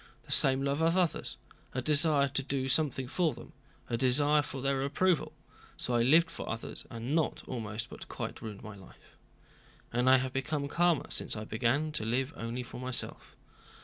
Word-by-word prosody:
The - - -10
same 135 0 +5
love 140 +2 0
of 165 +2 +3
others, 175 -4 0 0.4
a 130 - 0
desire 150 -1 +4
to 135 0 -1
do 135 -1 -2
something 135 -2 +1
for 160 0 0
them, 120 - -12 0.3
a 120 - -1
desire 145 +4 +3
for 140 -2 -6
their 135 0 0
approval.—So 145 -4 -2
I 120 - +3
lived 160 +7 +5
for - - -6
others, 115 0 -4
and 115 +4 -4
not 160 -1 0
almost, 115 -1 -4
but - - -9
quite, - - -6
ruined 105 -3 -7
my 110 -1 -8
life. 95 -1 -17 0.8
And 125 +2 +3
I 130 - +8
have 130 0 -2
become 140 +2 -2
calmer 170 +1 +1
since - - -2
I 105 - -5
began 125 +8 0
to 150 - -2
live 130 +6 -1
only 115 +2 -4
for 120 - -9
myself." 130 -1 -3
135 Hz, 180 wpm, -31 LUFS, 120-150 Hz, 0.8 s, I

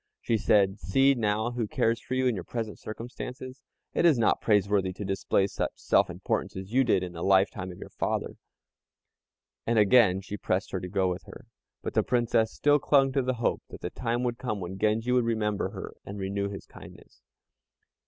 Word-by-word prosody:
She 115 - 0
said, 100 -1 +3
"See 135 - +3
now 110 -1 0
who 120 -3 -2
cares 115 +2 +1
for 130 - -4
you 130 0 +1
in 125 - +3
your 95 -5 -4
present 110 +1 -5
circumstances. 125 +3 -7 0.3
It - - +1
is 165 -6 +5
not 115 - +2
praiseworthy 100 -3 +2
to 100 +2 -6
display 95 0 +1
such 100 - -3
self - - +2
importance - - -3
as 95 +3 -7
you 135 +1 +5
did 110 -6 +2
in 90 - -5
the 85 - -7
lifetime 95 0 +2
of 90 - -11
your - - -10
father." - - -2 1.3
And 115 0 +2
again 105 -3 +5
she 105 +1 -6
pressed 95 +1 -1
her 95 - -2
to 90 - -6
go 95 0 +1
with 90 0 -3
her, - - -12 0.4
but - - -4
the - - +3
Princess 115 -2 +1
still 145 0 +3
clung 135 -1 +3
to 135 - +1
the 130 0 -1
hope 115 - 0
that - - -10
the 90 - -4
time 120 0 -2
would 120 -1 -2
come 110 -5 -3
when 95 +1 -6
Genji 110 +3 +1
would 125 -1 +3
remember 110 -3 -1
her - - -8
and 100 - -8
renew 100 +1 -2
his 100 - -8
kindness. - - -15
110 Hz, 205 wpm, -28 LUFS, 95-125 Hz, 1.3 s, is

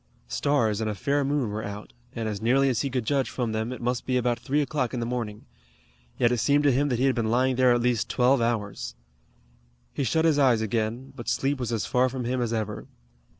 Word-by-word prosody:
Stars 110 - +1
and 110 - -1
a 105 - -3
fair 140 +8 0
moon 140 -5 0
were 110 +1 -4
out, 100 -8 -7 0.2
and 115 -1 -2
as 105 -2 -4
nearly 135 +4 +3
as 125 - 0
he 140 - -1
could 125 -3 -2
judge 135 +1 +1
from 120 -3 -2
them 110 +2 -2
it 125 - -7
must 125 0 -1
be 130 -1 +2
about 120 -1 0
three 140 +5 0
o'clock 140 -4 -1
in - - -2
the 115 - -2
morning. 115 -4 -4 0.7
Yet 120 -1 +3
it 125 - +1
seemed 145 +5 +3
to 145 - +5
him 140 +3 +1
that 125 - 0
he 130 - +1
had 135 - +3
been 115 -3 -1
lying 130 +2 +2
there 130 0 +4
at 120 0 +3
least 120 -2 +1
twelve 125 +1 +3
hours. 105 - -2 1.0
He - - -1
shut 160 +5 +1
his 155 -3 +3
eyes 125 -5 +4
again, 115 +4 -2
but 120 -4 -5
sleep 135 +4 0
was 120 -2 -3
as 110 -5 -1
far 125 +1 +2
from 125 -1 -4
him 125 +1 -1
as 120 -2 -1
ever. 110 -2 -3
125 Hz, 240 wpm, -26 LUFS, 110-135 Hz, 1.0 s, to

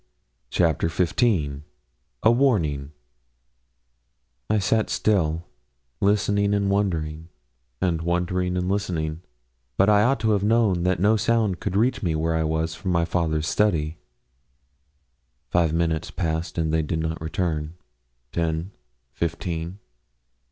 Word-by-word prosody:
CHAPTER 80 0 +1
XV 85 - +1 0.6
A 110 - +6
WARNING 85 - +1 1.6
I 110 - +3
sat 110 +2 +1
still, 85 -6 +1 0.6
listening 100 0 +2
and 100 -1 +1
wondering, 80 -5 -1 0.5
and 85 -3 0
wondering 90 +1 0
and 90 0 -1
listening; 85 -5 -2 0.6
but 95 +2 +4
I 105 0 +5
ought 130 +5 +2
to 110 -1 +2
have 100 -2 +1
known 105 -5 +3
that 90 -1 +1
no 105 +4 +4
sound 110 -3 +1
could 90 - -3
reach 115 +6 +2
me 85 -6 0
where 80 +1 0
I 80 0 +1
was 80 +1 -1
from 95 +3 -5
my 85 -1 +2
father's 80 -3 0
study. 80 -7 +1 1.5
Five 85 -2 +3
minutes 80 -1 0
passed 80 -1 -3
and 80 -1 0
they 80 - +3
did 80 +1 -2
not 80 0 -3
return. 80 -1 -2 0.6
Ten, 85 +2 -1 0.4
fifteen. 85 +2 -3
85 Hz, 125 wpm, -24 LUFS, 80-100 Hz, 1.6 s, A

